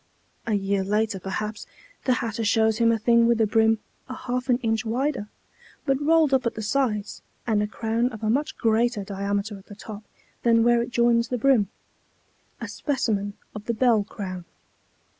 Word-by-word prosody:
A 220 - +2
year 195 0 0
later, 210 +1 0
perhaps, 210 +3 -4 0.4
the 255 - +4
hatter 230 -2 -2
shows 220 +1 +2
him 230 0 +4
a 230 - +2
thing 235 +1 +4
with 235 -1 +3
a 220 - +4
brim 220 +1 +3 0.3
a 255 - -5
half 250 +1 -3
an 245 - +4
inch 225 0 +1
wider, 245 -1 -1 0.6
but 270 -1 +1
rolled 315 -1 +4
up 260 -2 +3
at - - -3
the 220 - -5
sides, 210 -3 -1 0.2
and 215 -3 +2
a 210 - 0
crown 225 +3 -1
of 220 -3 -10
a 215 - +1
much 290 +5 -1
greater 225 -1 +1
diameter 200 +1 -3
at 190 - -20
the 205 - -10
top 210 0 -9 0.4
than 230 -1 +4
where 240 0 +4
it 235 - -3
joins 235 -1 +3
the 250 - -2
brim, 235 -5 +3 0.9
a - - -5
specimen 210 -8 -1 0.2
of 210 0 -8
the 235 - -1
bell 230 -3 +3
crown. 185 -4 -7
225 Hz, 185 wpm, -25 LUFS, 210-240 Hz, 0.9 s, the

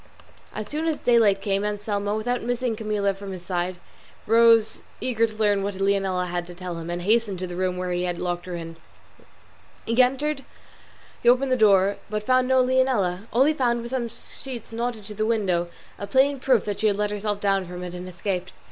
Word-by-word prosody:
As 215 -1 -5
soon 310 +5 -2
as 315 -2 0
daylight 215 -5 +3
came 200 0 0
Anselmo, 205 0 -2
without 245 +3 -1
missing 245 -1 -1
Camilla 210 -2 0
from 195 0 -8
his 180 -1 -9
side, 180 0 -1 0.5
rose 230 0 +4 0.2
cager 230 -3 +1
to 215 - -12
learn 205 -2 +2
what 200 0 -3
Leonela 195 -2 +1
had 175 -1 -3
to 175 - -10
tell 180 -1 -6
him, 165 +1 -7
and 175 0 -3
hastened 215 -1 +2
to 185 - -4
the 175 -1 -6
room 185 0 -1
where 180 0 -3
he 180 0 0
had 175 -1 -2
locked 175 0 -3
her 180 - -4
in. 165 -1 -7 1.1
He - - -3
opened 265 -1 -1
the - - +5
door, 205 -5 +5
entered, 200 - -2
but 210 0 -2
found 255 +2 +3
no 260 0 +4
Leonela; 245 -7 +1
all 255 +4 +4
he 310 - +3
found 240 -5 0
was 235 - -7
some 255 -3 -1
sheets 235 0 -8
knotted 230 -1 -3
to 210 +1 -7
the 215 +1 -2
window, 195 -6 +1 0.3
a 200 - -5
plain 270 +6 +3
proof 255 -4 +2
that 205 -1 -3
she 220 - +2
had 200 -1 +1
let 210 0 0
herself 205 0 -2
down 195 -2 +1
from 180 0 -7
it 180 -1 -6
and 180 +1 -7
escaped. 185 0 -3
210 Hz, 210 wpm, -24 LUFS, 185-235 Hz, 1.1 s, the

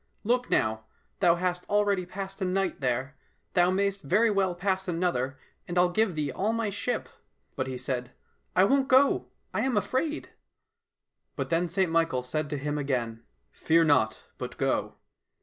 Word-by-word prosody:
Look 245 +3 +1
now, 110 0 +1 0.3
thou 175 -3 +5
hast 180 0 -1
already 205 -3 +2
passed 195 +1 -7
a - - +1
night 185 -3 -1
there, 130 +2 -1 0.4
thou 175 0 +4
mayst 195 +1 0
very 210 +10 +3
well 190 -3 +1
pass 190 +1 -1
another, 165 -7 -1 0.3
and 175 -1 -3
I'll 180 0 +4
give 215 -2 +1
thee 150 -2 -1
all 205 - 0
my 225 -2 -1
ship." 205 +5 -2 0.2
— - - -45
But 130 -2 -2
he 130 -1 -4
said, 125 -1 -3 0.2
" - - -44
I 185 - +6
won't 270 +6 +3
go, 270 +1 +4 0.3
I - - 0
am 260 -4 +1
afraid." 260 +10 -1 0.5
— - - -56
But - - -4
then 170 +2 +2
St 185 -1 0
Michael 165 -6 +1
said 145 +4 -2
to 145 - -2
him 145 +2 -2
again, 120 -5 -2 0.2
" - - -46
Fear 165 +1 +3
not, 130 -8 +2 0.2
but - - -6
go - - 0
180 Hz, 185 wpm, -28 LUFS, 145-200 Hz, 0.5 s, I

